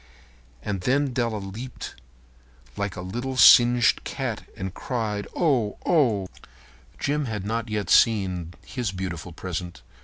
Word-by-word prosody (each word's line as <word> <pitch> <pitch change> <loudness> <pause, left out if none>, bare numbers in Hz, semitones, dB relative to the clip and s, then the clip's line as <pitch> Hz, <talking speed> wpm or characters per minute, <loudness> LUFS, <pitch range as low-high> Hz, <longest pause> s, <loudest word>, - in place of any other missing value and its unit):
And 100 -3 -3
then 135 +5 +1
Della 115 -3 0
leaped 105 +6 -7 0.8
up - - -27
like 100 -1 -3
a 90 - -6
little 120 +8 -4
singed 120 -4 +7
cat - - -4
and 95 -1 -4
cried, 110 -5 -3
"Oh, 130 -11 +1
oh!" 115 - +2 0.7
Jim 145 +1 -1
had 105 -5 -4
not 115 +2 -2
yet 105 -3 -2
seen 90 -6 +3
his 120 -7 -3
beautiful 90 -2 -5
present. 90 +1 -6
105 Hz, 130 wpm, -25 LUFS, 95-125 Hz, 0.8 s, singed